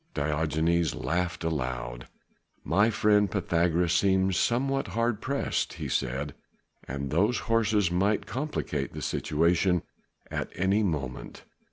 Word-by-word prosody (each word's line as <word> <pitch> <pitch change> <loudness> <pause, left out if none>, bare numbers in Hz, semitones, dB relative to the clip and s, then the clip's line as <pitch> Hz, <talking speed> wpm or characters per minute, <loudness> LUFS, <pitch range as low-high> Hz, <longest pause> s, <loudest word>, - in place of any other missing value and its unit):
Diogenes 80 +3 +1
laughed 85 0 -2
aloud. 65 -6 -3 0.6
"My 100 +9 +3
friend 105 -2 +3
Pythagoras 85 -2 +1
seems 95 +1 +3
somewhat 135 +6 +1
hard 115 -2 +1
pressed," 140 +1 -1
he - - -5
said, 70 +3 -2 0.5
"and 70 +1 -4
those 105 +9 +2
horses 110 -5 +2
might 100 +4 +1
complicate 150 +5 -3
the - - -6
situation 85 +3 +1 0.5
at - - -3
any 95 +4 +2
moment. 75 -10 -3
90 Hz, 115 wpm, -28 LUFS, 80-105 Hz, 0.6 s, My